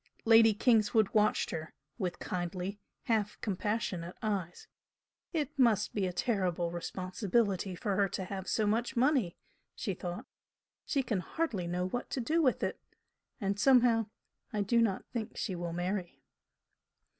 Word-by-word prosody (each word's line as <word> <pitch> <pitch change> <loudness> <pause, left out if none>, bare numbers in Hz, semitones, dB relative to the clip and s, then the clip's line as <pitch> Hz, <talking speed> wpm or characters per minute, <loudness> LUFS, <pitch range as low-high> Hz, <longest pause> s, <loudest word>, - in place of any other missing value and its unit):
Lady 225 0 +7
Kingswood 220 -1 +3
watched 215 0 +2
her, 160 0 -5 0.2
with 180 -3 -2
kindly, 180 +3 -4 0.2
half 220 -5 0
compassionate 195 -4 -2
eyes. 195 -5 -2 0.6
"It 300 -5 -1
must 230 -6 +3
be 195 -3 0
a - - -2
terrible 180 -4 0
responsibility 190 +2 -1
for 195 +3 -1
her 200 0 +2
to 190 - -3
have 190 0 -5
so 215 - +1
much 230 +5 0
money!" 250 - +2 0.4
she 200 - -2
thought. 175 0 -5 0.6
"She 275 -3 +1
can 220 -6 -1
hardly 205 - -2
know 180 +1 -1
what 245 +6 -4
to - - -2
do 315 +8 +1
with 260 -5 +2
it! - - -2 0.6
And 200 0 -1
somehow 235 -2 +5 0.4
I 210 - -1
do 235 +4 +3
not 205 -5 0
think 230 -3 -4
she 195 - -2
will 175 -1 -4
marry." 175 +1 -3
205 Hz, 145 wpm, -32 LUFS, 180-230 Hz, 0.6 s, Lady